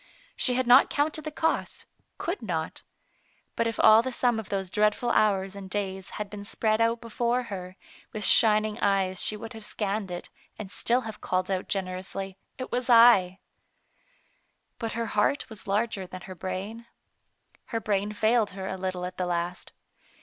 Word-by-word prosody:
She 250 Hz, -, +1 dB
had 255 Hz, 0 st, +1 dB
not 250 Hz, +3 st, +7 dB
counted 300 Hz, +2 st, 0 dB
the -, -, -2 dB
cost, 320 Hz, +2 st, -1 dB, 0.3 s
could 350 Hz, +4 st, -3 dB
not. 165 Hz, -7 st, -3 dB, 0.7 s
But 230 Hz, -, +1 dB
if 225 Hz, -, -4 dB
all 220 Hz, +1 st, +8 dB
the 260 Hz, +2 st, -4 dB
sum 240 Hz, -2 st, +1 dB
of 220 Hz, -, -8 dB
those 190 Hz, -2 st, -3 dB
dreadful 210 Hz, +4 st, +2 dB
hours 195 Hz, -3 st, +2 dB
and 195 Hz, -1 st, -8 dB
days 190 Hz, -1 st, -3 dB
had 210 Hz, -, -3 dB
been 200 Hz, 0 st, -8 dB
spread 220 Hz, +1 st, 0 dB
out 230 Hz, +1 st, +2 dB
before 235 Hz, +2 st, -1 dB
her, 185 Hz, -5 st, -7 dB, 0.4 s
with 215 Hz, -1 st, -3 dB
shining 215 Hz, 0 st, +4 dB
eyes 195 Hz, -2 st, +1 dB
she 215 Hz, -, 0 dB
would 225 Hz, +2 st, -8 dB
have 220 Hz, -1 st, -9 dB
scanned 205 Hz, -1 st, -2 dB
it, 175 Hz, 0 st, -7 dB, 0.3 s
and 200 Hz, -3 st, -7 dB
still 240 Hz, +6 st, +1 dB
have 220 Hz, -3 st, -8 dB
called 185 Hz, +1 st, -1 dB
out 185 Hz, -1 st, -2 dB
generously, 190 Hz, 0 st, -4 dB
" -, -, -47 dB
It 255 Hz, -, -6 dB
was 250 Hz, +1 st, -2 dB
I." 230 Hz, -6 st, +7 dB, 1.4 s
But 225 Hz, -2 st, -3 dB
her 230 Hz, 0 st, -2 dB
heart 210 Hz, +6 st, +1 dB
was 205 Hz, -3 st, -6 dB
larger 200 Hz, -1 st, -1 dB
than 185 Hz, 0 st, -9 dB
her 185 Hz, -, -8 dB
brain. 200 Hz, +6 st, -6 dB, 0.8 s
Her 230 Hz, -, -3 dB
brain 205 Hz, -1 st, -1 dB
failed 220 Hz, +1 st, +2 dB
her 190 Hz, 0 st, -4 dB
a 190 Hz, -, -4 dB
little 185 Hz, -1 st, -3 dB
at 180 Hz, 0 st, -7 dB
the 180 Hz, -, -1 dB
last. 175 Hz, +1 st, -3 dB
210 Hz, 180 wpm, -27 LUFS, 190-230 Hz, 1.4 s, all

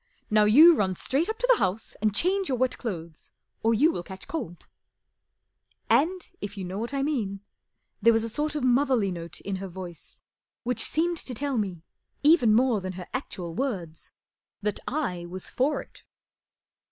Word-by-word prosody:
Now 215 Hz, 0 st, +5 dB
you 310 Hz, +11 st, +8 dB
run 190 Hz, -7 st, 0 dB
straight 285 Hz, -, 0 dB
up 440 Hz, -, -2 dB
to -, -, 0 dB
the -, -, +5 dB
house 195 Hz, +5 st, -1 dB
and 210 Hz, -2 st, +1 dB
change 380 Hz, -, +1 dB
your 255 Hz, -, 0 dB
wet 255 Hz, +1 st, 0 dB
clothes 170 Hz, -8 st, -6 dB, 0.3 s
or 225 Hz, +1 st, +3 dB
you 305 Hz, +9 st, +4 dB
will 175 Hz, -, -4 dB
catch 190 Hz, +2 st, -10 dB
cold/' 205 Hz, -, -5 dB, 1.3 s
And, 360 Hz, +4 st, +2 dB
if 205 Hz, 0 st, -6 dB
you 195 Hz, -, -4 dB
know 185 Hz, +2 st, -4 dB
what 235 Hz, +3 st, -3 dB
I 275 Hz, -1 st, -1 dB
mean, 215 Hz, -10 st, -2 dB, 0.6 s
there 230 Hz, +3 st, +6 dB
was 225 Hz, -1 st, +2 dB
a 230 Hz, -, -2 dB
sort 300 Hz, +6 st, -1 dB
of 295 Hz, -, -2 dB
motherly 255 Hz, -5 st, +3 dB
note 170 Hz, -2 st, -6 dB
in 195 Hz, -1 st, -3 dB
her 195 Hz, +1 st, -5 dB
voice 175 Hz, -3 st, -10 dB, 0.4 s
which 245 Hz, -2 st, -1 dB
seemed 340 Hz, +2 st, +1 dB
to 255 Hz, -5 st, -5 dB
tell 275 Hz, 0 st, -1 dB
me, 185 Hz, -6 st, -3 dB, 0.4 s
even 295 Hz, -7 st, +6 dB
more 240 Hz, -3 st, +3 dB
than 185 Hz, 0 st, -4 dB
her 180 Hz, 0 st, -7 dB
actu 255 Hz, -8 st, -4 dB
a -, -, -4 dB
I 170 Hz, -, -6 dB
w 270 Hz, +9 st, 0 dB
ords, 165 Hz, -2 st, -11 dB, 0.5 s
that 210 Hz, -1 st, -1 dB
I 185 Hz, -, -2 dB
was 185 Hz, +1 st, -7 dB
for 280 Hz, +4 st, 0 dB
it. -, -, -20 dB
225 Hz, 190 wpm, -27 LUFS, 190-285 Hz, 1.3 s, you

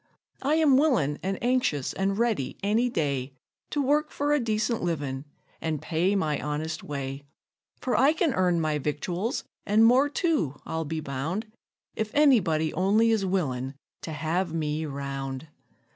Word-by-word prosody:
I 285 Hz, +3 st, +2 dB
am 305 Hz, -5 st, +5 dB
willin' 240 Hz, -, +2 dB
and 190 Hz, +1 st, -2 dB
anxious 245 Hz, -, +1 dB
an' 195 Hz, +1 st, 0 dB
ready 225 Hz, -, 0 dB
any 220 Hz, +5 st, +2 dB
day 140 Hz, -, -1 dB, 0.4 s
To 290 Hz, -, 0 dB
work 300 Hz, +3 st, +2 dB
for 290 Hz, +1 st, 0 dB
a 295 Hz, -, +3 dB
decent 220 Hz, -1 st, 0 dB
livin', 145 Hz, -5 st, -2 dB, 0.4 s
an' 160 Hz, -1 st, -1 dB
pay 175 Hz, +7 st, 0 dB
my 155 Hz, -7 st, 0 dB
honest 155 Hz, +1 st, -3 dB
way; 140 Hz, -1 st, -4 dB, 0.6 s
For 250 Hz, -5 st, -1 dB
I 270 Hz, +7 st, +5 dB
can 320 Hz, -4 st, +1 dB
earn 180 Hz, -3 st, +2 dB
my 155 Hz, -2 st, 0 dB
victuals, 175 Hz, -, -2 dB, 0.2 s
an' 215 Hz, +2 st, +4 dB
more 255 Hz, +5 st, +5 dB
too, 290 Hz, -, 0 dB
I'll 160 Hz, 0 st, -3 dB
be 160 Hz, +1 st, -3 dB
bound, 155 Hz, -, -3 dB, 0.5 s
If 220 Hz, -1 st, -2 dB
any 285 Hz, -4 st, +6 dB
body 160 Hz, -3 st, 0 dB
only 210 Hz, +5 st, +3 dB
is 205 Hz, -4 st, +1 dB
willin' 135 Hz, -8 st, -1 dB, 0.3 s
to 160 Hz, -, -6 dB
have 165 Hz, +4 st, -1 dB
me 155 Hz, 0 st, -1 dB
round. 135 Hz, 0 st, -5 dB
175 Hz, 160 wpm, -27 LUFS, 150-235 Hz, 0.6 s, any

